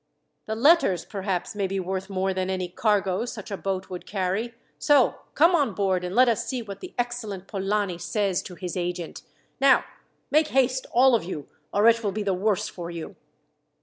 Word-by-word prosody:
"The 220 - -2
letters, 235 - +4
perhaps, 195 -3 -3
may 200 -2 -1
be 195 +1 -2
worth 190 +1 -3
more 190 0 0
than 185 0 -2
any 185 -1 -1
cargo 200 +1 +1
such 215 -4 -7
a - - -1
boat 190 -1 -3
would 180 - -7
carry. 200 +4 -2 0.2
So 290 -5 +4 0.2
come 335 +5 +5
on 285 - +2
board, 190 -3 +1
and 180 +2 -4
let 255 +1 +6
us 230 -2 +1
see 255 -3 -3
what 200 -2 -8
the 370 - -10
excellent 240 -6 -3
Polani 195 -2 -1
says 200 -1 0
to 180 - -10
his 180 -1 -5
agent. 175 -2 -4 0.4
Now, 275 0 +5 0.5
make 305 +1 +4
haste 260 -2 +1
all 255 +2 +5
of 230 - +3
you, 160 -5 -6 0.2
or 205 +2 +4
it 230 0 +4
will 205 - 0
be 210 +2 -3
the 195 -1 +1
worse 195 +1 0
for 170 -2 -7
you." 170 +3 -7
200 Hz, 195 wpm, -25 LUFS, 185-235 Hz, 0.5 s, let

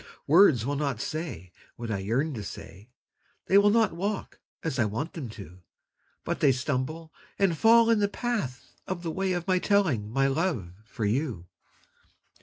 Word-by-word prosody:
Words 155 - +5
will 140 +1 -1
not 140 -6 -2
say 125 - -5 0.2
what 115 -1 -5
I 100 - -1
yearn 125 +10 -1
to 110 - -5
say 100 +2 -10 0.6
They 195 - +5
will 205 +1 +5
not 225 -2 +3
walk 200 +3 -4 0.2
as 150 -5 -2
I 115 - +4
want 115 - -3
them 140 -8 -6
to, 95 -4 -11 0.6
But - - -3
they 140 - +5
stumble 140 +5 -3 0.2
and 195 -4 +2
fall 230 +6 +5
in 225 - +3
the 205 - +3
path 205 - -3 0.2
of 185 -2 -4
the 165 - -2
way 190 +3 -1
Of 175 0 -3
my 185 -1 +3
telling 170 - +1
my 135 +4 +1
love 135 - -1
for 110 0 -4
you. 115 - -1
150 Hz, 175 wpm, -27 LUFS, 115-185 Hz, 0.6 s, Words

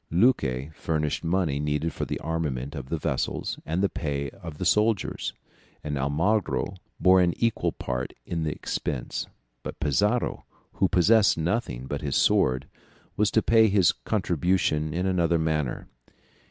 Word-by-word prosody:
Luque 80 - +2
furnished 75 -1 -2
money 85 -4 0
needed 75 +2 -1
for - - -3
the - - -3
armament 75 -4 -2
of 70 -4 -7
the 80 - -1
vessels - - -2
and 85 +5 0
the - - +5
pay 70 -6 -3
of 85 -5 -10
the - - -3
soldiers, 105 -1 +1 0.5
and 75 -1 -3
Almagro 85 +10 0 0.3
bore 95 0 +6
an 85 -1 +2
equal 115 -1 +1
part 60 0 -4
in 85 - -3
the 80 -1 -1
expense, - - -3 0.3
but - - -7
Pizarro, 105 - +1 0.3
who 95 - +2
possessed 105 +4 +4
nothing 85 - -2
but 70 +1 -4
his 70 -2 -2
sword, 65 +1 +3 0.5
was 105 0 +2
to 110 - +2
pay 115 -1 +5
his 95 -5 +4
contribution 85 -5 0
in 90 +4 -1
another 85 -3 +2
manner. 80 -5 -1
80 Hz, 150 wpm, -26 LUFS, 75-95 Hz, 0.5 s, bore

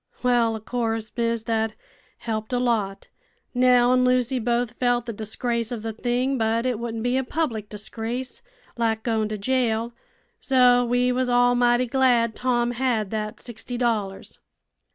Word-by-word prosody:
Well 240 -2 +3
o' - - -5
course, 225 -1 -3
miss, 230 -2 0
that 220 -1 -1 0.4
helped 220 -1 -4
a - - +2
lot. 220 -6 -1 0.4
Nell 250 -1 +4
an' 255 0 +3
Lucy 255 0 +2
both 240 0 -1
felt 245 -1 +1
the 230 - -4
disgrace 230 +2 -3
of 230 -3 -5
the 225 -1 -3
thing, 245 +3 -1
but 225 +2 +1
it 250 -4 0
wouldn't 230 -1 -4
be 245 +1 +1
a 265 - +1
public 245 -7 -2
disgrace, 225 +4 -5 0.4
like 225 -1 0
goin' 220 -2 0
to 215 - -3
jail; 235 0 0 0.5
so 250 - +4
we 245 +1 +1
was 250 0 0
all 245 0 +4
mighty 245 0 +3
glad 245 -3 +2
Tom 240 -1 0
had 235 -5 -1
that 215 -1 -4
sixty 240 +1 -7
dollars." 215 -5 -2
240 Hz, 160 wpm, -24 LUFS, 225-250 Hz, 0.5 s, Nell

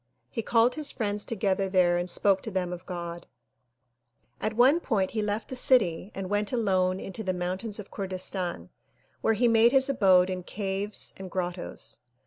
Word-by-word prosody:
He 230 - -2
called 230 +2 +3
his 305 -2 -1
friends 205 -2 -2
together 195 -3 0
there 180 -2 +3
and 175 +1 -3
spoke 195 +2 +2
to - - -5
them 180 -3 -2
of 180 +1 -9
God. 170 -1 -6 1.1
Afterward 235 - +2
he 220 - -1
left 210 +1 -2
the 260 - -4
city 215 -8 +3
and 195 -1 -4
went 205 +1 -1
alone 190 -5 +1
into 195 +3 -5
the 185 -2 -1
mountains 185 +4 -3
of 210 -2 -8
Kurdistan 185 - -4 0.5
where 225 - +2
he 240 +3 +3
made 230 +1 +5
his 270 0 +4
abode 190 -6 +4
in 185 0 -3
caves 200 +2 -3
and 190 -1 -8
grottoes. 175 -8 -4
195 Hz, 165 wpm, -28 LUFS, 185-220 Hz, 1.1 s, made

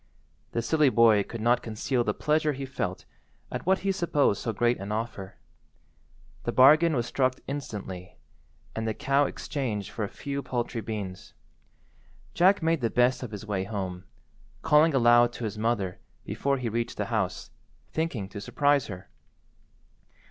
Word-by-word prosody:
The 115 - -1
silly 150 +3 +3
boy 115 -4 +5
could 115 +3 -6
not 120 +2 +3
conceal 120 +3 -1
the - - 0
pleasure 150 0 +1
he 135 0 -5
felt 95 -9 -4 0.5
at - - -5
what 190 0 +4
he 195 - +3
supposed 165 - +1
so 115 - -1
great 120 +3 +1
an 100 +2 -6
offer. 105 -3 -4 1.1
The - - -1
bargain 155 +5 +6
was 120 -2 0
struck 130 0 +1
instantly, 100 -10 -6 0.6
and 110 0 -2
the 110 - -1
cow 140 +1 +2
exchanged 110 -8 -4
for 110 - -4
a - - -1
few 140 0 -5
paltry 120 -3 -3
beans. 100 -4 -6 1.0
Jack 185 +1 +4
made 165 -2 +2
the 115 - +1
best 125 +2 +2
of 125 - -5
his 105 0 -8
way 100 -3 -1
home, 95 -3 -5 0.6
calling 150 0 +5
aloud 120 -1 +5
to - - -7
his 105 -1 -4
mother 110 -5 -1 0.3
before 140 0 -1
he 125 -2 -3
reached 115 +1 -2
the - - -1
house, - - -2 0.4
thinking 155 -12 -2
to 100 0 -7
surprise 145 +5 +2
her. 90 -2 -8
120 Hz, 160 wpm, -27 LUFS, 105-140 Hz, 1.1 s, bargain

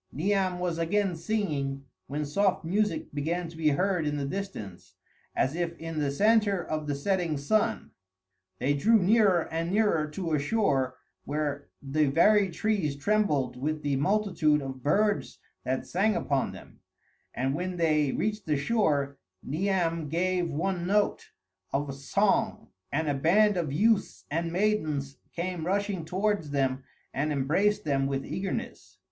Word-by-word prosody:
Niam 190 +3 0
was 175 -2 -2
again 195 +2 +1
singing, 150 -8 -2 0.2
when 150 +2 -2
soft 185 +4 +1
music 195 -2 0
began 165 +4 -2
to 165 - -12
be 160 -1 +2
heard 180 +2 +1
in 150 0 -1
the 140 - -2
distance, 140 - -6 0.4
as 130 - +1
if 170 -1 -2
in 165 -1 -5
the 145 -2 +1
centre 210 +5 +3
of 155 -1 -3
the 145 - -1
setting 170 0 0
sun. 215 +11 0 0.7
They 140 +8 +1
drew 215 +11 +4
nearer 200 -3 +3
and 165 +1 -1
nearer 200 -7 +2
to 165 +2 -4
a 150 - +3
shore 140 - +1 0.3
where 145 -1 -3 0.2
the 145 +2 +1
very 195 +7 +4
trees 175 -4 -1
trembled 150 -6 +1
with 155 +2 -2
the 145 -1 +1
multitude 165 -2 +2
of 130 -1 -6
birds 205 +9 +1 0.3
that 130 0 -1
sang 205 +4 +1
upon 140 -2 0
them; - - -13 0.6
and 130 +2 0
when 180 +3 -3
they 155 -4 +2
reached 210 +3 -2
the 150 -2 +2
shore, 140 - 0 0.2
Niam 165 -1 -1
gave 175 +2 0
one 175 +3 -2
note 205 +1 +1 0.4
of 140 0 -1
song, 135 0 0 0.2
and 160 +2 0
a 145 - +2
band 195 +9 +4
of 165 -6 -1
youths 210 +8 +1
and 165 +2 -1
maidens 155 -8 0 0.2
came 175 -1 -3
rushing 200 -3 -1
towards 190 -2 0
them 135 -2 0 0.3
and 150 +3 -1
embraced 160 +10 +1
them 135 -2 +1
with 135 -1 -2
eagerness. 190 +1 -5
165 Hz, 150 wpm, -28 LUFS, 145-195 Hz, 0.7 s, drew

